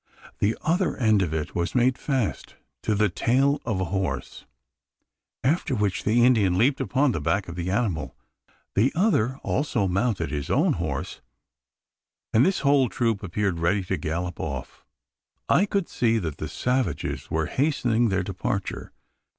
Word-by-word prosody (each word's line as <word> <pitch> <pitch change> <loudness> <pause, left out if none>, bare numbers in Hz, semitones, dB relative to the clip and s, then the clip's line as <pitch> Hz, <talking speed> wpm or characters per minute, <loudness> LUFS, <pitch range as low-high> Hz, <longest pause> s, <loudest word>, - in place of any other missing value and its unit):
The 105 +3 +1
other 180 +2 +1
end 110 -5 +3
of 85 -5 -1
it 80 -1 -3
was 85 +6 -2
made 125 +1 +3
fast 130 -6 -2 0.3
to 105 - 0
the 105 +1 +3
tail 135 +9 +1
of 110 -5 -1
a 95 - 0
horse; 95 -1 -3 1.0
after 140 0 +1
which 105 -4 -1
the 120 +3 +4
Indian 105 -8 +3
leaped 135 +6 +2
upon 135 +1 +2
the 85 - -3
back 85 +6 0
of 85 - -7
the 90 +1 -3
animal. 95 - -1 0.6
The 115 +7 +3
other 135 - +2
also 125 -7 0
mounted 95 -2 0
his 70 -2 -3
own - - +3
horse; - - -4 1.1
and 110 - +5
the 190 -2 +1
whole 140 -3 +4
troop 115 -4 0
appeared 95 -1 -1
ready 90 +4 +1
to 95 +1 -2
gallop 85 +3 -3
off. - - -6 0.6
I 200 - +4
could 195 -3 -1
see 115 -2 +1
that 80 -8 -3
the 80 - -4
savages 125 - -2
were 80 0 0
hastening 120 - +1
their 95 -1 0
departure. 95 +1 -4
110 Hz, 160 wpm, -25 LUFS, 90-130 Hz, 1.1 s, and